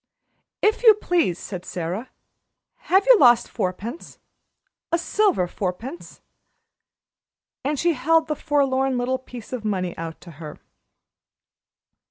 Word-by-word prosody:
"If 430 Hz, -, +2 dB
you 445 Hz, -3 st, +8 dB
please," 345 Hz, -, 0 dB
said 180 Hz, -1 st, -7 dB
Sara, 180 Hz, +9 st, -5 dB, 0.8 s
"have 385 Hz, +2 st, +4 dB
you -, -, +7 dB
lost 240 Hz, -3 st, +6 dB
fourpence 210 Hz, -, -5 dB, 0.7 s
a 335 Hz, -, +3 dB
silver 365 Hz, -, +1 dB
fourpence?" 200 Hz, -, -6 dB, 1.4 s
And 290 Hz, +2 st, -1 dB
she 340 Hz, +4 st, +2 dB
held 320 Hz, +4 st, +2 dB
the 305 Hz, -, -2 dB
forlorn 270 Hz, -3 st, +1 dB
little 255 Hz, +1 st, -1 dB
piece 250 Hz, -2 st, -11 dB
of 245 Hz, -3 st, -4 dB
money 185 Hz, -4 st, -2 dB
out 165 Hz, -1 st, -6 dB
to 170 Hz, -, -12 dB
her. 150 Hz, -2 st, -8 dB
255 Hz, 120 wpm, -23 LUFS, -, 1.4 s, you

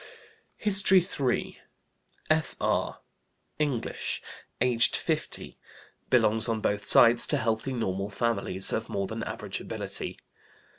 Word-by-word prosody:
HISTORY 195 Hz, -2 st, +6 dB
III. 140 Hz, -8 st, -3 dB, 0.7 s
F.R., 155 Hz, 0 st, -1 dB, 0.6 s
English, 140 Hz, -7 st, -3 dB, 0.4 s
aged 120 Hz, -1 st, +2 dB
50, -, -, -4 dB, 0.5 s
Belongs 110 Hz, +2 st, +3 dB
on 115 Hz, -1 st, -1 dB
both 105 Hz, -1 st, -2 dB
sides 115 Hz, 0 st, +6 dB
to -, -, +4 dB
healthy, 115 Hz, +3 st, -2 dB
normal 100 Hz, -4 st, -3 dB
families, 100 Hz, -3 st, 0 dB
of 110 Hz, -, -3 dB
more 100 Hz, 0 st, -3 dB
than 110 Hz, +3 st, -6 dB
average -, -, -6 dB
ability. -, -, -2 dB
115 Hz, 105 wpm, -27 LUFS, 105-130 Hz, 0.7 s, HISTORY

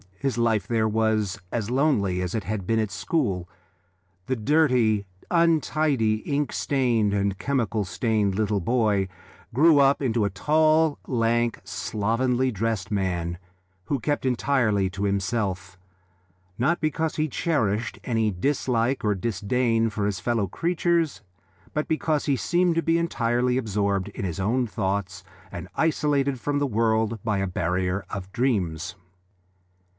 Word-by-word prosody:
His 130 Hz, +3 st, -2 dB
life 115 Hz, -4 st, +1 dB
there 110 Hz, -2 st, +1 dB
was 110 Hz, -2 st, 0 dB
as 115 Hz, -1 st, -2 dB
lonely 120 Hz, -10 st, +1 dB
as 90 Hz, -1 st, -3 dB
it 110 Hz, -, -1 dB
had 100 Hz, +1 st, -3 dB
been 115 Hz, -, +2 dB
at 110 Hz, -2 st, -1 dB
school. 100 Hz, -, -1 dB, 0.8 s
The 130 Hz, -, 0 dB
dirty, 125 Hz, -5 st, +2 dB, 0.3 s
untidy, 155 Hz, -9 st, +2 dB
ink 140 Hz, +6 st, -2 dB
stained, 120 Hz, -7 st, +1 dB
and 100 Hz, -1 st, 0 dB
chemical 115 Hz, -4 st, -1 dB
stained 105 Hz, -1 st, 0 dB
little 105 Hz, -1 st, +1 dB
boy 105 Hz, -1 st, +1 dB, 0.5 s
grew 150 Hz, +4 st, +5 dB
up 140 Hz, 0 st, +4 dB
into 120 Hz, -5 st, 0 dB
a -, -, +1 dB
tall, 155 Hz, -, +2 dB
lank, 120 Hz, -1 st, +1 dB
slovenly 125 Hz, +5 st, 0 dB
dressed 110 Hz, -2 st, -2 dB
man, 85 Hz, -4 st, -1 dB, 0.5 s
who 140 Hz, -, -1 dB
kept 145 Hz, +4 st, -1 dB
entirely 120 Hz, -6 st, +1 dB
to 100 Hz, +1 st, -5 dB
himself, 100 Hz, -2 st, -1 dB, 0.8 s
not 150 Hz, +9 st, +1 dB
because 160 Hz, +1 st, -1 dB
he 155 Hz, 0 st, 0 dB
cherished 115 Hz, -, -1 dB
any 115 Hz, -3 st, +1 dB
dislike 125 Hz, +4 st, 0 dB
or 105 Hz, -1 st, +2 dB
disdain 115 Hz, +2 st, 0 dB
for 105 Hz, -1 st, -2 dB
his 100 Hz, -2 st, -1 dB
fellow 110 Hz, 0 st, 0 dB
creatures, 170 Hz, -, 0 dB, 0.5 s
but 150 Hz, 0 st, -1 dB
because 155 Hz, -1 st, 0 dB
he 140 Hz, -, +2 dB
seemed 175 Hz, +5 st, +1 dB
to 165 Hz, -, +1 dB
be 165 Hz, +1 st, +2 dB
entirely 125 Hz, -6 st, 0 dB
absorbed 100 Hz, -4 st, -1 dB
in 100 Hz, -, -7 dB
his 85 Hz, -2 st, -4 dB
own 120 Hz, +6 st, +1 dB
thoughts 95 Hz, -2 st, -3 dB, 0.3 s
and -, -, -7 dB
isolated 145 Hz, -4 st, +1 dB
from 145 Hz, +3 st, -1 dB
the 145 Hz, -, +1 dB
world 110 Hz, -1 st, +1 dB
by 105 Hz, -3 st, 0 dB
a 95 Hz, -, 0 dB
barrier 90 Hz, +2 st, -1 dB
of 95 Hz, -1 st, -6 dB
dreams. 95 Hz, -, -1 dB
115 Hz, 140 wpm, -25 LUFS, 100-140 Hz, 0.8 s, grew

